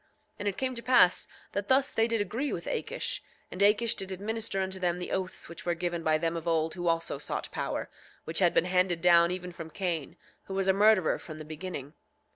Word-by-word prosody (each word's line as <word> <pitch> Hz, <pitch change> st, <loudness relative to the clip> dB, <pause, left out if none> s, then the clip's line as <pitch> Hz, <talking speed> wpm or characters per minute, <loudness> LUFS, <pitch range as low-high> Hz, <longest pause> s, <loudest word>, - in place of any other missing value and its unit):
8:15 -, -, -37 dB, 0.3 s
And 205 Hz, -, -3 dB
it 200 Hz, -, -1 dB
came 260 Hz, -1 st, -1 dB
to 235 Hz, -, -4 dB
pass 235 Hz, -8 st, +5 dB, 0.2 s
that 200 Hz, 0 st, -3 dB
thus 265 Hz, +1 st, +3 dB
they 225 Hz, 0 st, +3 dB
did 230 Hz, -2 st, 0 dB
agree 245 Hz, +7 st, -2 dB
with -, -, -4 dB
Akish. -, -, -3 dB, 0.3 s
And 185 Hz, -, -5 dB
Akish 210 Hz, +3 st, +4 dB
did 190 Hz, 0 st, -6 dB
administer 210 Hz, +2 st, -2 dB
unto 190 Hz, 0 st, -2 dB
them 175 Hz, -1 st, 0 dB
the 180 Hz, -, -5 dB
oaths 185 Hz, -1 st, -3 dB
which 170 Hz, -, -9 dB
were 175 Hz, -1 st, 0 dB
given 175 Hz, 0 st, -2 dB
by 155 Hz, -1 st, +3 dB
them 165 Hz, +1 st, -1 dB
of 165 Hz, 0 st, -5 dB
old 160 Hz, -1 st, +1 dB
who 175 Hz, -1 st, -4 dB
also 165 Hz, -4 st, 0 dB
sought -, -, -4 dB
power, -, -, -3 dB, 0.4 s
which 160 Hz, -, 0 dB
had 180 Hz, -3 st, +5 dB
been -, -, +3 dB
handed 180 Hz, -2 st, +1 dB
down 170 Hz, -1 st, +6 dB
even 180 Hz, 0 st, -4 dB
from 165 Hz, -2 st, -8 dB
Cain, 170 Hz, -5 st, -3 dB, 0.3 s
who 190 Hz, -, -6 dB
was 195 Hz, 0 st, 0 dB
a 190 Hz, -, +5 dB
murderer 205 Hz, -3 st, +4 dB
from 155 Hz, -2 st, -9 dB
the 155 Hz, -, -8 dB
beginning. 155 Hz, -2 st, -6 dB
180 Hz, 230 wpm, -29 LUFS, 170-205 Hz, 0.4 s, down